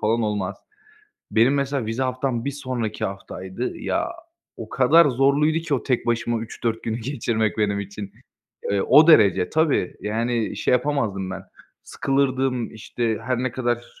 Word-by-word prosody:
falan 115 +2 +2
olmaz. 105 -2 -2 0.8
Benim 120 +5 +4
mesela 140 -4 -1
vize 115 +4 -2
haftam 130 -2 -1
1 140 - -1
sonraki 130 -6 -4
haftaydı, 95 -1 -5
ya, - - -1 0.5
o - - -8
kadar 150 +6 +5
zorluydu 140 +4 +2
ki 165 -3 -2
o 130 - -1
tek 125 -3 -1
başıma 120 0 0
3-4 115 0 -3
günü 110 -1 -2
geçirmek 110 -4 -1
benim 100 -1 +1
için. 100 0 -7 0.6
Eee, 100 -1 +1
o 150 +4 +6
derece 100 - +5
tabii, 155 - +1
yani, 115 +1 -1
şey, - - 0
yapamazdım 115 -8 0
ben 95 0 -6 0.4
sıkılırdım, 135 -3 0
işte, 110 0 -2
her 125 -2 -1
ne 130 - -1
kadar 120 -1 -1
120 Hz, 150 wpm, -23 LUFS, 110-135 Hz, 0.8 s, o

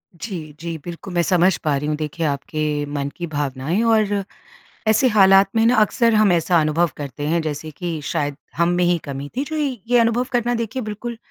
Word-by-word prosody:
जी, 165 -6 -7
जी 165 -1 -5
बिल्कुल 175 +2 -7
मैं 175 - +2
समझ 180 +1 +3
पा 150 -2 +1
रही 150 +2 -3
हूँ 150 - 0
देखिए, 155 +2 -3
आपके 145 +1 -2
मन 145 -1 -3
की 170 -1 -4
भावनाएँ 145 - -2
और 210 -3 +2 0.6
ऐसे 220 +4 +4
हालात 195 -3 +6
में 225 0 +3
ना, 245 - +4
अक्सर 225 +2 +3
हम 210 -3 +4
ऐसा 170 0 +3
अनुभव 155 +2 +1
करते 145 0 -5
हैं 165 +1 +1
जैसे 155 0 -4
कि 165 +1 -4
शायद 145 -1 -2 0.2
हम 170 0 +3
में 180 - +2
ही 175 0 +3
कमी 140 +1 -5
थी। 275 - +1
जो 315 +2 -5
इ 285 -4 -1
ये 245 - +5
अनुभव 230 +2 +2
करना 240 0 +1
देखिए 230 +3 -3
बिल्कुल 220 +2 -5
175 Hz, 205 wpm, -21 LUFS, 150-220 Hz, 0.6 s, हालात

